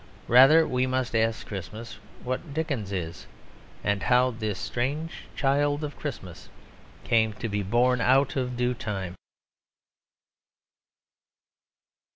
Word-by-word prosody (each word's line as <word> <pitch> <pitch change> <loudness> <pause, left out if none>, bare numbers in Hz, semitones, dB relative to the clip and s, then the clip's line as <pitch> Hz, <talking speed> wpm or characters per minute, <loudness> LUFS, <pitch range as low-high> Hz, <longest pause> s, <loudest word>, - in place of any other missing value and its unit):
Rather 135 +7 +7
we 125 0 0
must 130 -2 -1
ask 115 0 +1
Christmas 105 +4 -7 0.2
what 135 +4 -4
Dickens 140 -11 -2
is 85 -3 -5 0.6
ask 100 -1 +1
how 125 +1 +3
this 110 -4 -3
strange 145 - -3
child 145 +2 +1
of 150 -1 -4
Christmas 95 - -7 0.5
came 110 -2 +2
to 115 - -5
be 105 -1 -1
born 120 +5 +2
out 130 +3 +3
of 125 -2 -2
due 125 0 +1
time. 100 -6 -4
125 Hz, 115 wpm, -26 LUFS, 105-135 Hz, 0.6 s, Rather